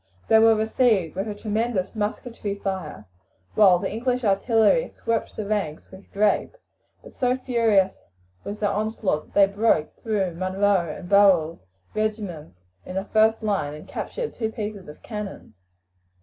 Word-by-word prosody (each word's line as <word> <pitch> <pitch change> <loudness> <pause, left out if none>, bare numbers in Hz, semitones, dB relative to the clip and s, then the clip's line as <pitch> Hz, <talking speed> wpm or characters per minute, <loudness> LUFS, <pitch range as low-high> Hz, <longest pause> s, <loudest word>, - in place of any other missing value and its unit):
They 220 - +7
were 225 0 +6
received 220 - +1
with 195 +3 -2
a 210 - -4
tremendous 215 -1 -2
musketry 210 0 -3
fire, 190 - -5 0.5
while 195 -4 +6
the - - -3
English 250 +2 -1
artillery 225 - +3
swept 230 -1 -3
the 215 - -4
ranks 200 -7 -3
with 190 +1 -14
grape; 205 +1 +1 0.5
but - - -13
so 250 0 0
furious 225 -7 +1 0.4
was 205 +1 -6
their 205 - +1
onslaught 210 -6 -1
that - - -26
they 200 - +7
broke 205 -7 +1
through 200 -6 -1
Munro 185 0 +1
and 175 +3 -9
Burrel's 180 - +4 0.3
regiments 205 - -3 0.3
in 185 - -8
the 190 +1 -2
first 220 +1 +2
line 190 -9 -1
and 150 - -12
captured 485 -2 -5
two 220 -2 -3
pieces 210 -3 -6
of 150 - -12
cannon. 210 -3 -7
205 Hz, 150 wpm, -24 LUFS, 190-220 Hz, 0.5 s, They